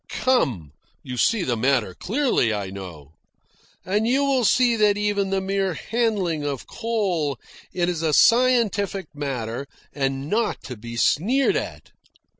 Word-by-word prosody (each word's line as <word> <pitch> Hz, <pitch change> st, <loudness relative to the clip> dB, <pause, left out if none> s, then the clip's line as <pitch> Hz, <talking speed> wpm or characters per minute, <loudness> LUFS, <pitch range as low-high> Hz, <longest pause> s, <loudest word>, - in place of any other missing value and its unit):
Come, 130 Hz, -, 0 dB, 0.3 s
you 125 Hz, -, -6 dB
see 210 Hz, -, +2 dB
the 125 Hz, -7 st, 0 dB
matter 120 Hz, -4 st, +1 dB
clearly, 230 Hz, -, 0 dB
I 100 Hz, -3 st, -3 dB
know. 85 Hz, -7 st, -9 dB, 0.7 s
And 205 Hz, +4 st, 0 dB
you 270 Hz, +4 st, +2 dB
will 270 Hz, -3 st, +2 dB
see 240 Hz, +2 st, +4 dB
that 210 Hz, -2 st, +3 dB
even 205 Hz, -1 st, 0 dB
the 195 Hz, 0 st, 0 dB
mere 195 Hz, -2 st, -1 dB
handling 200 Hz, -8 st, -1 dB
of 140 Hz, -2 st, -4 dB
coal 190 Hz, -, -1 dB, 0.3 s
is 175 Hz, -2 st, -1 dB
a 160 Hz, -2 st, +1 dB
scientific 220 Hz, -, +3 dB
matter 135 Hz, -3 st, -4 dB, 0.3 s
and 135 Hz, 0 st, -2 dB
not 215 Hz, +4 st, -1 dB
to 125 Hz, -, -7 dB
be 115 Hz, +2 st, -8 dB
sneered 240 Hz, -, +2 dB
at. -, -, -5 dB
180 Hz, 140 wpm, -23 LUFS, -, 0.7 s, see